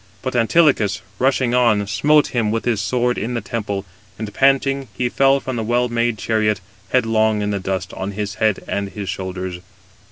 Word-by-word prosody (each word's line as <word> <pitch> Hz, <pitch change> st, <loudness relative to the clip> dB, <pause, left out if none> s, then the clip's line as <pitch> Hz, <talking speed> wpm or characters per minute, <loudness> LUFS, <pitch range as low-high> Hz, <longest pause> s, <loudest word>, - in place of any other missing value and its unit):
But 130 Hz, -1 st, -3 dB
Antilochus, 120 Hz, -, +3 dB, 0.2 s
rushing 130 Hz, -2 st, +2 dB
on, 115 Hz, -5 st, +3 dB
smote 145 Hz, +9 st, +3 dB
him 115 Hz, -4 st, 0 dB
with 115 Hz, +1 st, -2 dB
his 115 Hz, -4 st, +1 dB
sword 125 Hz, +3 st, 0 dB
in 120 Hz, +4 st, -3 dB
the -, -, 0 dB
temple, 100 Hz, -2 st, -4 dB, 0.3 s
and 110 Hz, -1 st, -6 dB
panting 135 Hz, 0 st, +2 dB
he 125 Hz, +4 st, 0 dB
fell 135 Hz, +2 st, +3 dB
from 130 Hz, -2 st, -4 dB
the 115 Hz, -, -1 dB
well 120 Hz, +2 st, +1 dB
made 120 Hz, -1 st, 0 dB
chariot, 105 Hz, -1 st, 0 dB, 0.3 s
headlong 110 Hz, -3 st, +2 dB
in 105 Hz, -, -1 dB
the 100 Hz, -, -1 dB
dust, 95 Hz, 0 st, -3 dB
on 100 Hz, +2 st, -4 dB
his 100 Hz, 0 st, -3 dB
head 110 Hz, -3 st, +2 dB
and 100 Hz, -1 st, -2 dB
his 100 Hz, 0 st, -6 dB
shoulders. 95 Hz, -1 st, -4 dB
110 Hz, 185 wpm, -20 LUFS, 100-125 Hz, 0.3 s, Antilochus